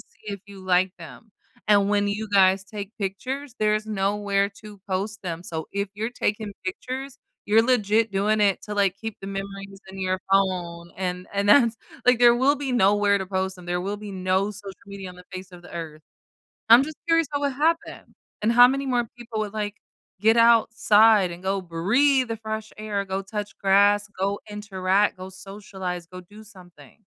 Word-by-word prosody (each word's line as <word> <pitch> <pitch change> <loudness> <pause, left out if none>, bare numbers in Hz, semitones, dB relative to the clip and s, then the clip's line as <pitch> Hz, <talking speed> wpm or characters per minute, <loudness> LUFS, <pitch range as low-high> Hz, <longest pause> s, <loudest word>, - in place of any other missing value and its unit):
see 210 - -11
if 200 - -12
you 200 -1 -12
like 185 0 +2
them. 170 - -13 0.4
And 200 -1 +4
when 205 0 +2
you 210 +1 -3
guys 190 -1 +4
take 205 0 -7
pictures, 255 +7 -4
there's 215 0 +1
nowhere 200 -1 0
to 210 -2 -12
post 200 +3 -3
them, 170 -1 -5
so 160 -3 -5
if 200 0 -2
you're 220 +3 -3
taking 210 -3 -2
pictures, 260 +7 -5 0.3
you're 220 +2 +5
legit 225 -3 +2
doing 210 +2 +1
it 200 -2 +3
to, 210 - -6
like, 195 -2 +1
keep 225 -1 -5
the 195 - -8
memories 195 0 -7
in 195 - -10
your 185 0 0
phone, 175 -3 0
and 180 -1 -3
and 200 0 0
that's 235 -1 +5 0.3
like, 250 -1 +5
there 240 -1 +7
will 275 +4 +3
be 270 -2 -3
nowhere 205 -2 +3
to 190 - -3
post 190 0 -2
them, 180 - -13
there 175 0 -1
will 200 +3 -3
be 205 -1 -8
no 190 +2 0
social 200 -2 -9
media 200 -2 -8
on 180 - -14
the 180 - -14
face 185 0 -8
of 175 -1 -12
the - - -14
earth. 155 -2 -7 0.7
I'm 235 +4 +9
just 310 +1 -7
curious 330 -3 +3
what 285 - -1
would 280 -2 0
happen, 325 +4 -1 0.3
and 215 - +2
how 245 +1 +9
many 275 +1 -2
more 245 -2 0
people 230 -2 -6
would, 210 0 -4
like, 210 -1 -3 0.4
get 220 +3 +4
outside 225 -3 +5
and 175 +2 -10
go 195 0 -1
breathe 240 +11 +2
the 225 - -3
fresh 220 0 -5
air, 205 -2 -3
go 190 +1 -3
touch 205 +1 -5
grass, 205 +1 +4
go 200 +1 -1
interact, 200 -1 0
go 185 +1 -8
socialize, 190 -2 -7
go 185 +1 -10
do 210 +4 -15
something. 180 - -17
200 Hz, 190 wpm, -24 LUFS, 190-220 Hz, 0.7 s, I'm